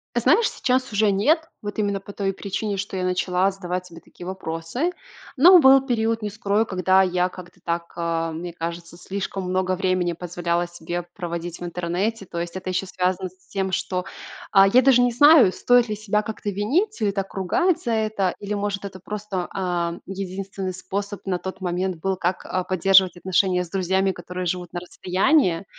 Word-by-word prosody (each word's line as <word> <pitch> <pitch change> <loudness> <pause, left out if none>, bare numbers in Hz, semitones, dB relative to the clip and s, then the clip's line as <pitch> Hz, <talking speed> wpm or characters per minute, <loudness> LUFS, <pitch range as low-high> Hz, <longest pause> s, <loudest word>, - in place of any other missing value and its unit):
А - - +3
знаешь, 330 - +4
сейчас 255 -1 0
уже 210 0 +3
нет. 220 - +3 0.2
Вот 205 +1 -5
именно 200 -2 0
по 200 +1 -11
той 195 -1 -1
причине, 200 +1 -3
что 195 0 -4
я 185 - -2
начала 180 +1 +1
задавать 180 -1 -4
себе 165 -1 -12
такие 175 - -13
вопросы. 185 - -3 0.4
Но 350 +6 +8
был 270 -1 +6
период, 230 -3 0
не 210 - -2
скрою, 205 +1 0
когда 185 0 +3
я 180 0 +1
как-то 180 -1 -12
так, 170 0 -3
а, 165 -1 -1
мне 170 +2 -6
кажется, 170 0 -6
слишком 195 +1 -4
много 185 0 0
времени 185 -2 0
позволяла 175 0 -2
себе 175 0 -5
проводить 170 -2 -5
в - - -8
интернете. 180 +5 -2
То 170 - -6
есть 170 +1 -5
это 185 0 -5
еще 185 +1 -1
связано 185 0 -1
с 185 +1 -29
тем, 190 -1 -2
что, 180 -1 -2 0.5
а, 195 0 +7
я 245 +6 +5
даже 260 -1 +5
не 245 0 +3
знаю, 290 - +7
стоит 245 +3 +3
ли 210 - -1
себя 210 0 0
как-то 215 -1 -5
винить 290 - 0
или 205 -2 +2
так 195 -1 -4
ругать 250 - +1
за 235 - -1
это, 215 -4 0
или, 205 0 -4
может, 200 -1 -2
это 190 -1 -8
просто, 200 -2 -4
ам, 175 -2 -2
единственный 195 0 -5
способ 200 +2 -5
на 185 -2 0
тот 190 +1 -6
момент 180 0 -1
был, 190 +3 -1
как, 180 0 -2
а, 185 - -2
поддерживать 185 0 +4
отношения 185 0 +1
с 175 - -11
друзьями, 190 +1 +1
которые 180 0 -6
живут 180 0 -3
на 175 - -2
расстоянии. 185 - +1
190 Hz, 190 wpm, -23 LUFS, 180-205 Hz, 0.5 s, Но